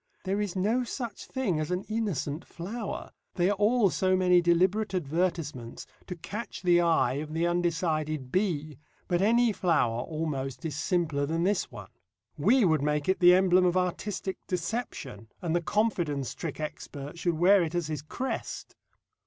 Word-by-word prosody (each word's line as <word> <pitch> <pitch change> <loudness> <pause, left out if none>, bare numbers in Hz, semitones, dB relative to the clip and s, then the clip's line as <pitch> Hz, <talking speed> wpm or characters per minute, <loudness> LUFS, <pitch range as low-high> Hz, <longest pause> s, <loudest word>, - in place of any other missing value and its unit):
There 195 +2 0
is 205 -3 -3
no 215 +7 +1
such 240 -1 -6
thing 210 - -1
as 155 - -2
an 180 +1 -1
innocent 190 - -3
flower; 205 +6 -6 0.2
they 180 +1 +2
are 205 - -1
all 210 -2 +4
so 185 0 +2
many 180 -1 +4
deliberate 185 +5 +2
advertisements 155 -6 -2 0.2
to 180 - -5
catch 205 +5 -7
the 175 -1 +5
eye 165 -5 +3
of 155 0 -7
the 165 +1 +1
undecided 160 -5 -1
bee, 155 -7 -1 0.3
but 175 -1 +1
any 235 +3 +4
flower 145 - +1
almost 135 -3 -4
is 155 -4 -3
simpler 155 -3 0
than 165 +2 0
this 200 +1 +1
one. - - -10 0.4
We 220 - +4
would 160 -4 +3
make 150 0 0
it 190 - +2
the 180 0 +8
emblem 185 -1 +4
of 180 0 +2
artistic 190 +1 -2
deception, 180 - -4
and 170 -2 -1
the 175 - +2
confidence 175 - 0
trick 160 -4 -6
expert 150 0 -6
should 170 -1 0
wear 190 +4 +6
it 165 0 -2
as 175 -2 0
his 155 -2 -4
crest. 250 - -5
175 Hz, 165 wpm, -28 LUFS, 155-195 Hz, 0.4 s, the